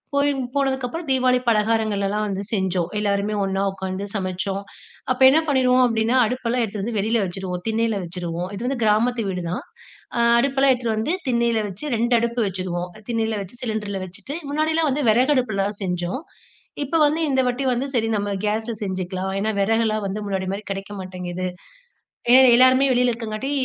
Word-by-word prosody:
போய் 285 +1 +3 0.2
போனதுக்கப்பறம் 270 +3 -1
தீபாவளி 255 -1 +3
பலகாரங்கள்லலாம் 215 -2 +1
வந்து 195 -1 -3
செஞ்சோம். 185 -4 0
எல்லாருமே 205 0 0
ஒண்ணா 195 0 -1
உக்காந்து 190 +1 -4
சமைச்சோம். 190 0 -2 0.5
அப்போ 255 - +1
என்ன 305 +4 +4
பண்ணிருவோம் 255 -2 +4
அப்டின்னா, 230 +2 +1
அடுப்பெல்லாம் 245 0 -1
எடுத்துட்டு 205 -2 -4
வந்து 230 -1 -2
வெளில 220 +2 +1
வச்சுடுவோம், 180 -1 -5
திண்ணைல 225 -1 0
வச்சுருவோம். 175 0 -4
இது 230 +5 -4
வந்து 260 -2 -2
கிராமத்து 225 +1 +2
வீடு 180 -2 -3
தான். 240 +10 -3 0.5
அ, - - +1 0.2
அடுப்பெல்லாம் 275 +1 +3
எடுத்துட்டு 240 -3 -2
வந்து 225 +10 0 0.2
திண்ணைல 235 -2 +2
வச்சு, 195 +9 -7
2 235 +2 +1
அடுப்பு 235 +1 -1
வச்சுருவோம். 180 -1 -3 0.2
திண்ணைல 225 -2 0
வச்சு 225 +6 -13
சிலிண்டர்ல 210 -4 -3
வச்சுட்டு, 205 +10 -7 0.2
முன்னாடிலாம் 315 +1 +1
வந்து 285 +2 -1
வெறகடுப்லதான் 220 -5 +1
செஞ்சோம். 180 - -2 0.6
இப்போ 285 +4 0
வந்து 300 +2 +3
இந்த 265 -1 +1
வாட்டி 250 +2 -1
வந்து, 250 +3 -1
“சரி, 225 -3 +1
நம்ம 205 0 -1
கேஸ்ல 220 +2 -1
செஞ்சுக்கலாம்,” 190 -1 -3
ஏன்னா 215 +2 0
வெறகெல்லாம் 215 +1 +1
வந்து 195 +2 -3
முன்னாடி 190 -2 -2
மாரி 200 +2 -4
கெடைக்க 195 +1 -5
மாட்டேங்குது. 185 -1 -5 0.9
ஏ - - +9 0.2
எல்லாருமே 255 +2 +6
வெளில 250 0 +3
இருக்கங்காட்டி, 230 +3 -4
220 Hz, 160 wpm, -22 LUFS, 195-250 Hz, 0.9 s, ஏ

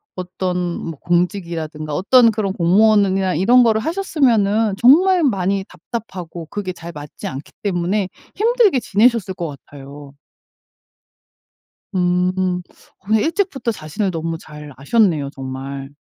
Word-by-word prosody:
어떤 185 0 -3 0.2
뭐 165 -4 -7
공직이라든가 170 -4 -2
어떤 230 +4 +5
그런 210 -2 -2
공무원으 200 +4 +4
이나 190 -1 0
이런 240 +9 +5
거를 220 -2 +3
하셨으면은 230 - +1
정말 340 - +5
많이 195 -5 0
답답하고 180 -4 -7
그게 190 -2 -5
잘 170 -1 -9
맞지 150 -2 -8
않기 135 +2 -7
때문에 190 0 -1 0.3
힘들게 440 - +3
지내셨을 215 -2 +2
것 170 -2 -4 0.2
같아요. 140 0 -12 1.8
음 180 0 0 0.4
그런데 210 +3 +1
일찍부터 325 - -1
자신을 190 +3 -3
너무 165 -1 -4
잘 150 -2 -11
아셨네요 155 - +1
정말. 135 0 -7
185 Hz, 290 characters per minute, -19 LUFS, 165-220 Hz, 1.8 s, 어떤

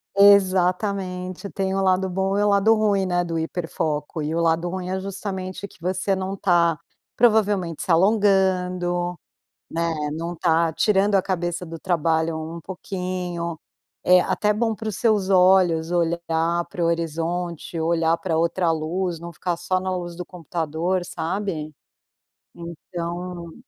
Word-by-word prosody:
Exatamente, 190 -1 +3
tem 190 -1 -2
o 195 - +1
lado 190 0 +2
bom 190 +2 0
e - - +2
o 205 - +3
lado 200 +2 +5
ruim, 205 -3 +2
né, 175 -1 +1
do 165 -1 -3
hiperfoco. 160 -2 -3
E 155 +1 -2
o 170 - +1
lado 170 +1 +1
ruim 185 0 -4
é 190 0 -1
justamente 190 -1 -5
que 185 - -20
você 185 +3 0
não 190 +1 -3
tá, 170 -4 +2 0.4
provavelmente 205 -8 +2
se - - -5
alongando, 180 -2 +2 0.5
né? 165 - -2 0.4
Não 170 +1 -4
tá 165 0 +2
tirando 200 +2 +2
a 195 - +4
cabeça 175 -1 -2
do 165 -1 -8
trabalho 165 -2 0 0.2
um - - -6
pouquinho. 180 -1 -4 0.5
Eh, 180 0 +6
até 210 +3 +1
bom 225 +1 0
pros 215 -2 -5
seus 210 -4 +2
olhos 180 -3 +4
olhar 170 0 0
pro 175 - -3
horizonte, 170 +1 -2
olhar 165 0 +2
pra 165 -3 -1
outra 170 +1 +1
luz, 165 +2 -2
não 170 0 -7
ficar 175 +2 -2
só 175 +2 -1
na 185 0 -2
luz 175 -1 -5
do 180 - -5
computador, 170 +1 -2
sabe? 170 -3 -3 0.8
Então 170 +1 -6
180 Hz, 145 wpm, -23 LUFS, 170-190 Hz, 0.8 s, Eh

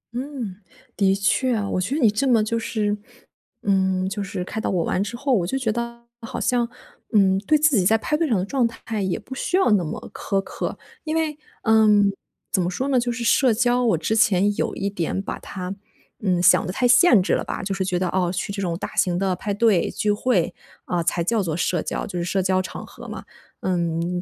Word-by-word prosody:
嗯， 245 -7 -5 0.4
的 195 0 +3
确 235 +6 +1
啊， 205 -2 -1
我 185 - -1
觉 255 +10 -1
得 315 - -1
你 225 - +6
这 245 +6 0
么 235 -4 +4
就 230 +2 -1
是 210 -2 -1 0.7
嗯， 190 -1 +1
就 205 +1 -3
是 190 -2 -4
开 220 +4 -5
导 - - -1
我 175 -3 +1
完 185 - 0
之 230 +3 -5
后， 275 +1 0
我 175 -6 +2
就 270 - -1
觉 235 -5 0
得 235 +1 -5 0.2
好 225 - -5
像， 240 -1 +1 0.4
嗯， 195 -2 +4
对 305 - +5
自 300 -2 +3
己 185 - +2
在 220 +4 +4
派 300 - -1
对 325 +1 +1
上 225 - +2
的 185 - -1
状 250 +2 +1
态 225 -2 -5
也 190 -2 -1
不 225 +4 -9
需 355 +7 0
要 380 - +3
那 195 -4 +3
么 155 - -6
苛 195 - -1
刻。 - - -5 0.3
因 310 0 -2
为 315 -2 0 0.3
嗯， 210 -2 +4 0.4
怎 190 - +2
么 175 - 0
说 260 +9 -2
呢？ 260 -3 +3
就 240 0 -1
是 235 0 -4
社 245 -1 +4
交 245 +2 +2
我 220 -9 +3
之 190 +7 -1
前 205 -2 +3
有 - - -2
一 200 - -2
点 190 -2 -2
把 195 - -5
它， 185 0 -6 0.5
嗯， 185 -4 +1
想 180 -1 +5
的 185 - -2
太 245 +5 +1
限 245 - +6
制 - - 0
了 - - +1
吧。 - - -5
就 195 0 -2
是 190 -1 -1
觉 180 -1 -1
得， 185 0 0
哦， 180 -1 0
去 185 +2 -3
这 200 - -4
种 170 -3 -2
大 - - -6
型 175 -1 +2
的 190 0 +1
派 205 - -4
对、 205 -4 +3
聚 210 - 0
会， 205 -5 +1 0.3
啊， 175 -1 -1
才 170 0 0
叫 220 +4 +1
作 165 -5 -2
社 175 -1 0
交 - - -3
就 180 -2 -5
是 - - -1
社 190 +2 0
交 185 0 +2
场 - - -7
合 - - -12
嘛。 - - -7 0.4
嗯， 175 0 -1
205 Hz, 255 characters per minute, -23 LUFS, 185-235 Hz, 0.7 s, 你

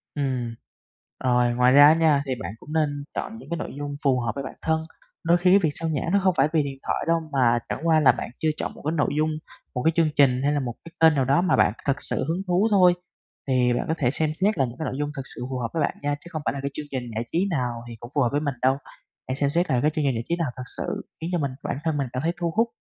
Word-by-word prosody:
Ừm. 130 -5 -2 0.7
Rồi, 125 -1 +3
ngoài 125 +1 +4
ra 145 +1 +9
á 155 - +7
nha, 160 -3 +3
thì 135 - -4
bạn 85 - -4
cũng 150 - -10
nên 145 -3 0
chọn 225 - -4
những 195 - -13
cái 170 - -2
nội - - -5
dung 145 0 -4
phù 135 -3 +3
hợp 120 -2 -1
với 140 - -4
bản 130 - -6
thân, 160 0 0 0.4
đôi 170 +1 +4
khi 180 +1 +3
cái 195 - +7
việc 165 -5 +1
sao 165 0 -2
nhãng 155 +1 -1
nó 200 - +4
không 185 -1 +4
phải 135 - +5
vì 155 -2 +3
điện 135 -1 -6
thoại - - 0
đâu, 165 0 +3
mà 120 -4 +3
chẳng - - -3
qua 160 -1 +5
là 150 - +6
bạn - - -5
chưa 160 - +1
chọn - - -3
một - - -13
cái 155 - +1
nội 145 - +2
dung, 155 +1 +2 0.5
một 125 - -1
cái 160 - +4
chương 165 -2 +3
trình 130 -3 +4
hay 145 +1 +2
là 145 - +1
một 125 -3 -3
cái 165 - -10
kênh 160 -1 +6
nào 135 -2 +2
đó 140 +6 +3
mà 185 -1 +3
bạn - - +3
thực 140 +1 +1
sự - - -1
hứng 170 +4 -1
thú 180 +4 +3
thôi. 180 -3 +6 0.5
Thì 125 -2 +3
bạn 120 - -1
có 160 - +1
thể 125 -5 +1
xem 155 +1 0
xét 205 0 +2
là 135 - +3
những 120 0 -8
cái 155 - -3
nội - - -3
dung 145 0 -1
thực 135 - -3
sự - - -8
phù 130 - -2
hợp 120 - -1
với 165 - 0
bạn - - 0
nha, 145 0 0
chứ 150 +4 -14
không 155 -3 -4
phải - - +1
là 140 - -5
cái 140 - -3
chương 150 - -5
trình 130 -2 -2
giải 110 - -1
trí 170 - +1
nào 120 -6 -2
thì 115 - -8
cũng 120 +2 -10
phù 145 - +3
hợp 120 - +3
với 145 - 0
mình 145 -2 -1
đâu. 130 +1 +3 0.5
Hãy 130 - -2
xem 140 0 +1
xét 175 +4 +1
là 125 -3 +2
cái 150 - +3
chương 155 -2 -1
trình 135 - +2
giải 115 - -2
trí 170 - +2
nào 165 -6 -1
thực 130 - -5
sự - - -3 0.2
khiến 165 - -3
cho 175 - +1
mình, 140 -3 -1
bản - - -2
thân 160 -2 0
mình 140 -2 -1
cảm 130 - -2
thấy 165 - +2
thu 170 -1 0
hút, 230 +2 +3
145 Hz, 315 wpm, -25 LUFS, 130-165 Hz, 0.7 s, ra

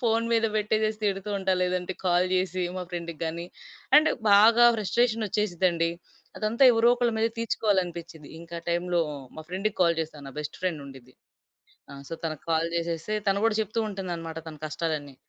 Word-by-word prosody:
Phone 230 0 +2
మీద 225 0 +3
పెట్టేసేసి 215 0 0
తిడుతూ 195 0 -1
ఉంటా. 190 0 +1
లేదంటే 180 0 -1
కాల్ 180 0 +3
జేసి 185 0 0
మా 185 - -3
ఫ్రెండ్‌కి 170 -2 -5
గాని 170 +2 -4 0.5
అండ్ 310 +1 +3 0.2
బాగా 230 +4 +7
ఫ్రస్ట్రేషనొచ్చేసిద్దండి. 205 -6 +1 0.5
అదంతా 220 +5 0
ఎవరో 230 +1 +4
ఒకళ్ళ 240 -2 +1
మీద 225 - +3
తీర్చుకోవాలనిపిచిద్ది. 175 -8 -1
ఇంకా 170 0 -8
టైంలో 175 0 +1 0.4
మా - - -6
ఫ్రెండ్‌కి 195 +3 -2
కాల్ 170 -1 +3
చేస్తా. 155 -1 -9
నా - - -10
బెస్ట్ 150 0 -7
ఫ్రెండ్ 165 -6 -1
ఉండిద్ది. 130 -2 -13 0.8
ఆహ్, 140 0 -10
సో, - - -4
తనకి 155 -2 -4
కాల్ 165 0 +2
జేసేస్తే, 170 +4 -2
తను 195 0 +2
కూడా 225 - +1
చెప్తూ 215 +2 -3
ఉంటుందనమాట 170 -5 -5
తన 155 - -9
కష్టాలన్నీ. 150 -3 -3
180 Hz, 155 wpm, -27 LUFS, 165-215 Hz, 0.8 s, బాగా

